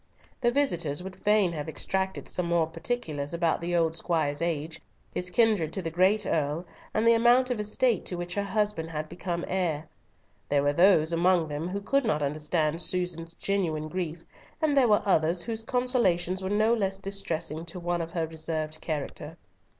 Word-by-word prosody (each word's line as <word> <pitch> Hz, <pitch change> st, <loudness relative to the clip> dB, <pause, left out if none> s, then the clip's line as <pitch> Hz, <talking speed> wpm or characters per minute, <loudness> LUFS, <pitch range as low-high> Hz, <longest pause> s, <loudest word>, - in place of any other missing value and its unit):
The 240 Hz, -, +3 dB
visitors 180 Hz, -, 0 dB
would 190 Hz, 0 st, -7 dB
fain 210 Hz, -4 st, +2 dB
have 150 Hz, -1 st, -4 dB
extracted 190 Hz, +4 st, -2 dB
some 180 Hz, -1 st, -2 dB
more 170 Hz, -1 st, +2 dB
particulars 160 Hz, -5 st, -3 dB
about 170 Hz, -1 st, +1 dB
the 175 Hz, +1 st, -1 dB
old 165 Hz, -1 st, +2 dB
squire's 155 Hz, -4 st, 0 dB
age, 160 Hz, -2 st, -2 dB, 0.3 s
his 180 Hz, -, -2 dB
kindred 205 Hz, -6 st, +2 dB
to 190 Hz, -, -2 dB
the 165 Hz, -, -3 dB
great 190 Hz, +4 st, +3 dB
Earl, 155 Hz, +3 st, -1 dB, 0.3 s
and 220 Hz, +2 st, +1 dB
the 230 Hz, -, +7 dB
amount 240 Hz, +2 st, +4 dB
of 240 Hz, -, -1 dB
estate 215 Hz, +1 st, +1 dB
to 180 Hz, -, -3 dB
which 175 Hz, 0 st, -4 dB
her 200 Hz, -, 0 dB
husband 205 Hz, -5 st, -1 dB
had 155 Hz, -1 st, -4 dB
become 170 Hz, +1 st, -4 dB
heir. 165 Hz, -5 st, -1 dB, 0.6 s
There 140 Hz, -1 st, +2 dB
were 145 Hz, 0 st, +2 dB
those 170 Hz, -2 st, +4 dB
among 170 Hz, -1 st, +3 dB
them 150 Hz, +3 st, -3 dB
who 200 Hz, +2 st, -3 dB
could 275 Hz, +7 st, +1 dB
not 150 Hz, -10 st, 0 dB
understand 155 Hz, +2 st, 0 dB
Susan's 175 Hz, -2 st, 0 dB
genuine 165 Hz, -6 st, -1 dB
grief, 170 Hz, -2 st, -4 dB, 0.4 s
and 310 Hz, -3 st, +1 dB
there 265 Hz, -3 st, +5 dB
were 210 Hz, -2 st, +3 dB
others 170 Hz, -2 st, +2 dB
whose 225 Hz, -1 st, -2 dB
consolations 225 Hz, -8 st, +1 dB
were 190 Hz, -, -3 dB
no 215 Hz, +3 st, +3 dB
less 195 Hz, -4 st, 0 dB
distressing 170 Hz, -5 st, -2 dB
to 170 Hz, +2 st, -6 dB
one 175 Hz, 0 st, -1 dB
of 165 Hz, 0 st, -6 dB
her 165 Hz, -2 st, 0 dB
reserved 155 Hz, -1 st, -4 dB
character. 150 Hz, -4 st, -5 dB
175 Hz, 180 wpm, -28 LUFS, 160-200 Hz, 0.6 s, the